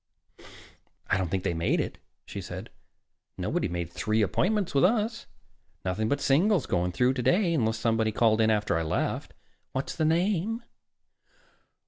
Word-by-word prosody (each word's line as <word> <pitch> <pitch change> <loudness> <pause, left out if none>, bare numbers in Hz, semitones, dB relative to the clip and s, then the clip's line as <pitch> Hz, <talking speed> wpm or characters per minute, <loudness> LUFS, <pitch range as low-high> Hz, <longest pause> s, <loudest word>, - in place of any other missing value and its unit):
"I 95 - +4
don't 90 -3 -1
think 95 +1 -1
they - - 0
made 80 0 +1
it," - - -3 0.3
she - - -6
said. - - -7 0.7
"Nobody - - -1
made 85 -1 -4
three 110 +4 +1
appointments 195 - 0
with 140 - +3
us. 220 +3 +1 0.6
Nothing 100 +4 -1
but 145 - +1
singles 165 - +3
going 90 -1 0
through 125 +7 +2
today, 170 - +2
unless 110 -7 +1
somebody 110 -1 +1
called 110 0 +3
in 110 - +4
after 105 -5 +1
I 80 - +1
left. 80 - -2 0.4
What's 130 +1 -3
the 160 - 0
name?" 190 +7 +1
115 Hz, 150 wpm, -28 LUFS, -, 0.7 s, I